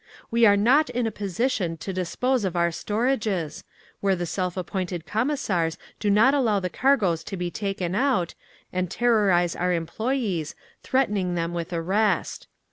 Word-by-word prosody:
"WE 230 0 +5
ARE 205 0 +5
NOT 265 +9 +4
IN 245 0 -1
A 225 - -1
POSITION 200 -4 -1
TO 190 +4 -5
DISPOSE 235 +7 0
OF 185 -2 -2
OUR 170 0 +2
STORAGES, 210 - -1 0.4
where 195 -1 +2
the 175 -1 -3
self 180 +1 -2
appointed 180 -2 -3
Commissars 210 - 0 0.2
do 210 - 0
not 215 +7 +5
allow 230 -8 +2
the 180 -2 -3
cargoes 205 - +2
to 195 - -5
be 175 -1 -3
taken 195 -4 -3
out, 205 - +1 0.4
and 185 -1 -1
terrorise 200 -6 +2
our 180 +1 0
employees, 180 - -2 0.3
threatening 205 -9 0
them 170 0 -2
with 170 0 -4
arrest. 185 +3 0
195 Hz, 155 wpm, -25 LUFS, 175-230 Hz, 0.4 s, WE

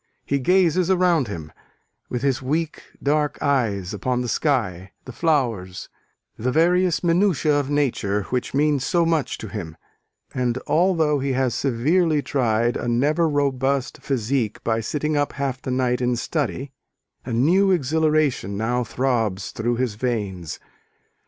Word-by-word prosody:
He 140 - 0
gazes 180 +3 +3
around 175 -7 +3
him, 80 -6 -7 0.6
with 125 0 -3
his 135 -1 +1
weak 155 +4 -2 0.2
dark 150 +1 +1
eyes, 110 -9 0
upon 125 +4 -1
the 125 - -3
sky, 95 -3 -1
the 130 - -7
flowers, 115 - -1 0.5
the 125 +3 0
various 175 +3 +3
minutiæ 170 -3 +2
of 140 -1 -3
nature 115 -8 0
which 125 -1 -1
mean 145 0 +2
so 170 +6 +1
much 165 -4 0
to 110 - -7
him: 85 -7 -7 0.6
and 125 -1 0
although 160 -4 +2
he 135 0 -1
has 130 -1 +1
severely 150 +5 +1
tried 120 -3 +1
a - - -4
never 150 +8 +2
robust 140 -2 0
physique 125 -3 -1
by 115 -1 +1
sitting 150 +6 -2
up 145 0 0
half 135 -2 -3
the - - -5
night 125 -1 0
in 125 0 +1
study, 135 +1 -3 0.5
a 125 - -6
new 170 +12 +3
exhilaration 155 - +1
now 120 +3 0
throbs 115 -5 -1
through 120 +2 -1
his 125 -2 -1
veins. 100 -8 -3
130 Hz, 145 wpm, -23 LUFS, 115-155 Hz, 0.6 s, gazes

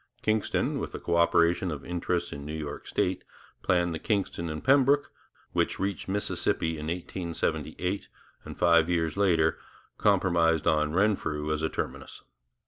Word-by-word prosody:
Kingston, 110 -1 0
with - - -5
the - - -5
co - - -1
operation 85 +1 +3
of 75 -4 -5
interests 90 0 -2
in 70 - -7
New 75 +2 -5
York 75 -2 -6
state, 90 0 -1 0.4
planned 85 -2 +1
the 80 - -4
Kingston 95 -5 -1
and 75 0 -5
Pembroke, 140 +2 +4 0.4
which - - +1
reached 100 0 -2
Mississippi 95 -4 0
in 75 -1 -5
1878, 90 +2 -3 0.4
and - - -9
five 85 -1 +4
years 80 -3 0
later 85 -5 +2 0.4
compromised 85 -5 +3
on 75 -2 +2
Renfrew 80 -6 +1
as 75 - -2
a 80 - 0
terminus. - - -5
85 Hz, 145 wpm, -28 LUFS, 80-95 Hz, 0.4 s, Pembroke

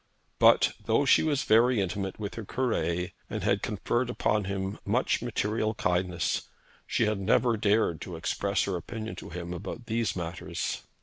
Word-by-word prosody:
But, - - +6
though - - +3
she - - +6
was 150 -4 +1
very 115 +2 +4
intimate 95 0 -2
with 105 -1 -5
her 115 - -6
Cure, 90 -7 -1 0.2
and - - -4
had - - +2
conferred 120 +1 -1
upon 105 -4 +1
him 95 0 -3
much - - +1
material 110 +1 -1
kindness, 90 -3 0 0.4
she 120 - +2
had 105 -2 0
never 115 +5 +3
dared 105 -5 +2
to 90 - -6
express 100 +4 0
her 95 - -1
opinion 110 +3 -5
to - - -8
him 85 +1 -5
upon 100 +6 -6
these 115 -1 -1
matters. 85 -1 -3
100 Hz, 165 wpm, -28 LUFS, 90-115 Hz, 0.4 s, But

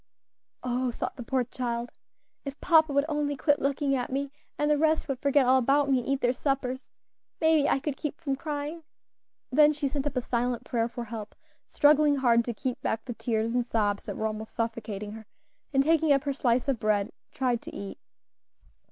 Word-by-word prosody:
"Oh!" 250 0 0
thought 235 - -4
the - - -8
poor 255 +1 0
child, 240 -1 -4 0.5
"if 275 0 -7
papa 315 -3 +4
would 280 +1 +2
only 295 -2 -1
quit 290 +2 +2
looking 275 0 +1
at 250 -1 -3
me, 275 +1 -2 0.3
and 295 0 +1
the - - +5
rest 315 +1 +2
would 270 -3 -3
forget 280 -1 +3
all 260 +1 +5
about 275 +3 +2
me 260 - +4
and 240 - -7
eat 275 0 0
their 245 0 +2
suppers, 260 -1 -2 0.5
maybe 320 -3 +4
I - - +3
could 285 -1 -3
keep 300 0 -4
from 280 -5 -1
crying." 295 +3 -4 0.7
Then 300 +3 +6
she 295 -1 -2
sent 280 +1 -2
up 285 - -4
a - - +2
silent 245 0 -1
prayer 235 -3 0
for 240 0 -6
help, 220 -2 -7 0.3
struggling 295 0 +4
hard 240 -4 +3
to 240 - -2
keep 255 +2 -3
back 220 0 -2
the 245 - -4
tears 225 -1 -1
and 245 0 +2
sobs 210 -4 0
that - - -5
were 220 - -2
almost 220 0 -4
suffocating 220 -3 -3
her, 220 0 -10 0.4
and 270 -1 +3
taking 320 0 +3
up 275 -1 +4
her 285 -1 -1
slice 250 -1 +1
of 270 -5 0
bread, 210 0 +1 0.2
tried 250 -3 0
to - - -9
eat. 200 -1 -7
265 Hz, 205 wpm, -28 LUFS, 235-290 Hz, 0.7 s, Then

